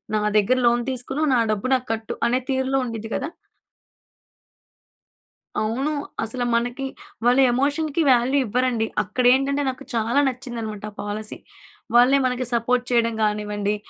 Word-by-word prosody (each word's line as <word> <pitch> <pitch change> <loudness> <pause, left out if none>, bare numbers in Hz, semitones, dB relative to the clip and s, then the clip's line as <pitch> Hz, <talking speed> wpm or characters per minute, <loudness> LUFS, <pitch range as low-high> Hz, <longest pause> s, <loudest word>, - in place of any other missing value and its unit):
నా 215 - +1 0.2
దగ్గర 210 +5 +3
లోన్ 240 0 +2
తీసుకున్నావు 265 +4 -1
నా 240 - +4
డబ్బు 215 +5 -3
నాకు 255 -1 -3
కట్టు 220 0 -5
అనే 250 +2 +1
తీరులో 265 0 +1
ఉండిద్ది 225 -2 -6
గదా! 280 - -2 2.3
అవును. 255 +7 -1 0.3
అసలు 245 +2 -2
మనకి 245 +3 -1 0.4
వాళ్ళు 250 +2 +5
ఎమోషన్‌కి 290 +5 0
వాల్యూ 250 +3 +3
ఇవ్వరండి. 245 0 0 0.2
అక్కడ 230 +5 -2
ఏంటంటే 275 +2 +1
నాకు 260 +1 -6
చాలా 230 +4 +1
నచ్చిందనమాట 235 -5 -5
ఆ - - -25
పాలసీ. 210 +1 -5 0.6
వాళ్ళే 250 +3 +6
మనకి 255 0 -1
సపోర్ట్ 245 +1 +1
చేయడం 230 -1 +2
గానివ్వండి, 210 -1 -1
245 Hz, 135 wpm, -23 LUFS, 225-260 Hz, 2.3 s, వాళ్ళే